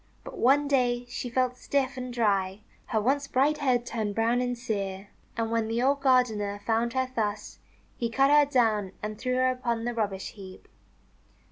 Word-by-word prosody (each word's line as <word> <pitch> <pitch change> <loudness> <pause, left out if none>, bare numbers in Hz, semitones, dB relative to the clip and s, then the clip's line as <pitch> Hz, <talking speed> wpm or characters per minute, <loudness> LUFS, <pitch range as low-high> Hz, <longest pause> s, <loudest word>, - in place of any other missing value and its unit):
But - - -9
one 280 +4 +4
day 245 -3 +1
she 245 - -4
felt 250 +1 0
stiff 270 0 -1
and 255 -1 -5
dry. 200 -4 0 0.3
Her 220 - 0
once 275 +6 0
bright 280 +3 +2
head 250 -4 +1
turned 215 -4 -3
brown 230 +2 +2
and 245 -1 -2
sere. 200 -4 -4 0.3
And 225 -1 -1
when 230 -1 0
the 230 +2 -1
old 280 +1 +2
gardener 220 -7 +2
found 230 +1 +1
her 260 -1 -1
thus, 210 -2 -3 0.4
he 235 - -1
cut 270 +4 +3
her 295 -1 +5
down 215 -7 +2
and 210 0 -5
threw 255 -1 -1
her 255 0 +3
upon 235 -3 -2
the 240 - -1
rubbish 205 -4 -3
heap. 190 -2 -12
240 Hz, 180 wpm, -27 LUFS, 215-255 Hz, 0.4 s, her